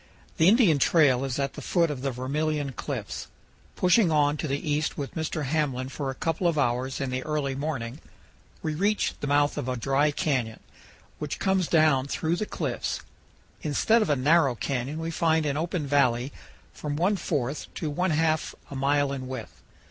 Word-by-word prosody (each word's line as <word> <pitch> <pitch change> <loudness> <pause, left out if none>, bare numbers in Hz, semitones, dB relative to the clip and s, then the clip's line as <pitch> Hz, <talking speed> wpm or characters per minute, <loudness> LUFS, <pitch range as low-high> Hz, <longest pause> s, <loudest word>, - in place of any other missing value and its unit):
The 160 - +5
Indian 200 - +5
trail 135 -5 +4
is 135 -2 -2
at 140 -1 -1
the - - -8
foot 170 -3 +1
of 135 -3 -5
the 135 - -1
Vermilion 145 +3 -1
Cliffs. - - -5 0.5
Pushing 180 +1 +4
on 145 -1 +3
to 155 - -3
the 140 0 0
east 150 +1 0
with 140 -3 -4
Mr. 160 -1 -2
Hamblin 135 -3 -1
for 140 0 -4
a 135 - -4
couple 165 +5 0
of 165 -2 +1
hours 130 -1 0
in 135 -2 -2
the 130 0 -2
early 150 -2 -1
morning, 135 -2 -4 0.6
we 155 - -1
reach 200 +7 +1
the 145 - -3
mouth 145 +1 +2
of 130 - -3
a 125 - -1
dry 135 +5 +2
canyon, 130 -6 -1 0.6
which - - -3
comes 190 -3 +1
down 155 -5 +3
through 160 +4 -1
the 215 - -2
cliffs. - - -3 0.6
Instead 220 +10 +2
of 210 - 0
a 145 - +4
narrow 140 0 +3
canyon 135 +4 -3
we 165 +1 -3
find 160 -1 +2
an 140 -1 0
open 165 0 -2
valley 135 -2 +2 0.4
from 145 -1 -4
one 180 +7 +2
fourth 145 -6 -3
to 155 - -3
one 180 +6 0
half 160 0 +1 0.2
a - - -5
mile 140 +1 +2
in 130 -2 -4
width. 130 -4 -7
145 Hz, 185 wpm, -27 LUFS, 135-160 Hz, 0.6 s, The